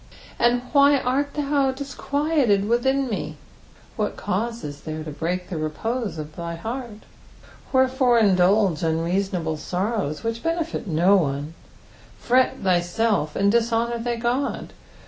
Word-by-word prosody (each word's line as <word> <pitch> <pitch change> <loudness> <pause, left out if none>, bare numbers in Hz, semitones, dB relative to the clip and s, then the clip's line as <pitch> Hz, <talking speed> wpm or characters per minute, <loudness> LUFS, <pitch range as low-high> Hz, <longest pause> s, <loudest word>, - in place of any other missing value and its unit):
"And 245 +1 +3
v>bp 280 -2 +5
art 280 +3 0
thou 280 -2 +1
disqnUled 285 +1 -1 0.2
tcitkia 265 +4 +1
met" 155 -6 -3 0.6
What - - -1
cause 230 +5 -2
is 145 -1 -7
there 155 0 -5
to 155 - -6
break 180 +4 -3
the 165 - -3
repose 215 +7 -3
of 155 0 -7
thy 170 -1 -5
heart? 225 +4 -6 0.7
Wherefore 260 -2 +3
in 205 -4 +4
dulge 185 -1 +3
unreasonable 165 0 -1
sorrows, 185 -1 -2
which 230 0 -2
benefit 330 -6 -2
no 175 +4 +4
one, 145 -2 -2 0.6
fret 255 +1 +2
thyself, 180 -1 +1
and 200 0 +3
dishonour 235 +1 +1
thy 235 0 -2
Qod? 245 +4 -1
225 Hz, 130 wpm, -23 LUFS, 170-255 Hz, 0.7 s, v>bp